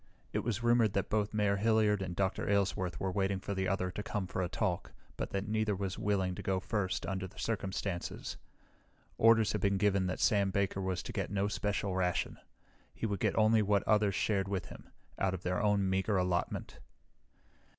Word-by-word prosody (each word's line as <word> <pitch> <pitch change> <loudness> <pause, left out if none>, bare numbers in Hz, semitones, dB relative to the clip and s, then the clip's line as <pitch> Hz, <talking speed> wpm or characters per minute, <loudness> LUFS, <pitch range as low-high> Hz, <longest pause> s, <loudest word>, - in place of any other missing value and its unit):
It - - +1
was 115 -1 -2
rumored 120 -3 +4
that 100 - -1
both 105 -1 +1
Mayor 105 -2 +1
Hilliard 105 -1 +3
and 90 -2 -4
Dr. 95 +1 -1
Aylesworth 95 -3 0
were 95 - -1
waiting 95 0 0
for 100 - -4
the 95 -1 -1
other 95 -1 0
to 105 - -5
come 105 -2 -3
for 95 - -3
a 90 - -1
talk, 90 -1 -2 0.2
but - - -3
that 100 +1 -3
neither 110 -1 +1
was 95 -1 -3
willing 95 -3 +1
to - - -6
go 95 -1 0
first 95 -1 -2
under 95 -1 -3
the - - -18
circumstances. 100 -4 -3 0.8
Orders 115 -1 +5
had 105 - -2
been 100 0 +2
given 100 -2 +2
that 90 - -3
Sam 100 -2 +3
Baker 100 0 0
was 95 -2 -2
to - - -6
get - - -2
no 100 0 0
special 100 -2 -1
ration. 90 -1 0 0.6
He - - -3
would 100 -3 -1
get - - 0
only 110 0 +5
what 100 -1 +2
others 105 -2 +3
shared 100 -3 +1
with 100 -2 -3
him - - -12 0.3
out 95 -1 +1
of 90 - -9
their 90 0 0
own 105 -2 +2
meager 95 +2 +1
allotment. 90 -1 -1
100 Hz, 200 wpm, -33 LUFS, 95-105 Hz, 0.8 s, Orders